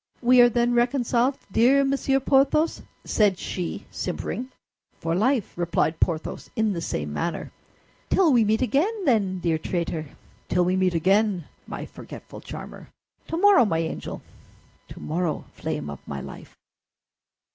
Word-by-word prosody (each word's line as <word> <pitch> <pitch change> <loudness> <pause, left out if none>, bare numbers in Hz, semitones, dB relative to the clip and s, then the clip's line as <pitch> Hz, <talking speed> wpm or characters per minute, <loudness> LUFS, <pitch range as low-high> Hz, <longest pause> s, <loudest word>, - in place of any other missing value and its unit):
"We 250 +1 +7
are 240 - +7
then 240 +1 +1
reconciled, 245 +1 +2
dear 260 +7 +4
Monsieur 270 0 +1
Porthos?" 275 +4 +2 0.2
said 205 -4 +2
she, 180 -2 -4
simpering. 255 +2 -4 0.5
"For 165 - -1
life," 225 +5 +1
replied 170 -2 0
Porthos, 165 -2 -2
in 220 -2 +1
the 170 - -4
same 75 - -3
manner. 170 - -3 0.6
"Till 340 -7 +4
we 235 -2 +5
meet 220 +3 +2
again, 370 - 0
then, 205 -8 +2
dear 165 -3 0
traitor!" 165 -2 -3 0.4
"Till 180 -1 +2
we 180 +1 +1
meet 185 -2 +1
again, 190 +1 +2 0.2
my - - -6
forgetful - - -11
charmer!" - - -9 0.4
"Tomorrow, 350 - +5
my 165 -6 0
angel!" 165 0 -4 0.6
"Tomorrow, 165 -1 -3
flame - - -4
of 70 -2 -7
my 70 - -4
life!" - - -10
215 Hz, 135 wpm, -25 LUFS, 170-255 Hz, 0.6 s, We